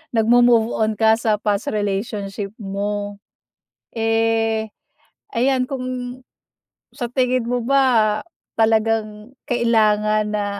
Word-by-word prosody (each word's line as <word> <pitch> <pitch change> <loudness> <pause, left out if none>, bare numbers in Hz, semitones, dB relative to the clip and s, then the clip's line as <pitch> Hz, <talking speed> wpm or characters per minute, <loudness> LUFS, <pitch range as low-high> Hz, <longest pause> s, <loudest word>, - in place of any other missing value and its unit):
nag-mo-move 235 0 +4
on 220 0 +1
ka 220 -1 +5
sa 220 -2 0
past 210 +5 -1
relationship 200 -1 -3
mo. 205 0 -4 0.8
Eh, 225 -1 0 0.6
ayan, 255 +1 +2
kung 270 -3 -4 1.1
sa 240 -3 -4
tingin 250 -1 0
mo 245 0 -1
ba 240 -5 +3 0.4
talagang 220 +1 0
kailangan 215 -3 +2
na 210 -1 -1
220 Hz, 95 wpm, -20 LUFS, 210-235 Hz, 1.1 s, ka